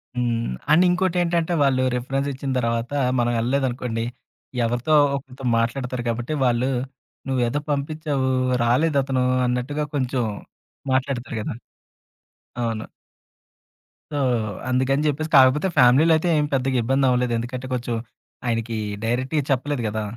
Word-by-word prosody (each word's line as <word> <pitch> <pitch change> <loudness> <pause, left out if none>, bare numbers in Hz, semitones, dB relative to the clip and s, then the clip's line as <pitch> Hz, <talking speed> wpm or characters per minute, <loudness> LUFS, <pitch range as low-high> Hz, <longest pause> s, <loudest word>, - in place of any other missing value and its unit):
హ్మ్. 120 - -1 0.2
అండ్ 165 +4 +6
ఇంకోటేంటంటే, 175 -2 +1
వాళ్ళు 130 -2 +2
రెఫరెన్స్ 135 +3 -2
ఇచ్చిన 135 +1 -4
తరువాత 115 0 -1 0.3
మనం 120 0 +2
ఎళ్ళలేదనుకోండి, 125 -2 -1 0.6
ఎవరితో 120 +6 0 0.2
ఒకరితో 135 -1 -8
మాట్లాడతారు 125 +1 -1
కాబట్టి 120 +5 -2
వాళ్ళు 125 +1 +2 0.6
"నువ్వేదో 125 +1 +1
పంపిచ్చావు. 145 -1 -1 0.3
రాలేదతను" 135 0 +2 0.2
అన్నట్టుగా 130 +5 -1
కొంచెం 130 -2 0 0.7
మాట్లాడతారు 130 -3 -1
గదా! - - -4 1.1
అవును. 115 -2 -2 1.3
సో, 145 - -2 0.5
అందుకని 130 +3 +1
జెప్పేసి, 155 +2 -1
కాకపోతే 135 +7 +5
ఫ్యామిలీలో 135 +6 +6
అయితే 175 +3 -1
ఏం 150 - +2
పెద్దగా 130 -1 +1
ఇబ్బంది 135 +3 +2
అవ్వలేదు. 125 -1 +1
ఎందుకంటే 125 +2 -5
కొంచెం, 120 -1 -2 0.5
ఆయనకి 115 -1 -1 0.3
డైరెక్ట్‌‌గా 130 +6 0
చెప్పలేదు 135 0 0
గదా! 110 0 -2
130 Hz, 115 wpm, -23 LUFS, 120-140 Hz, 1.3 s, అండ్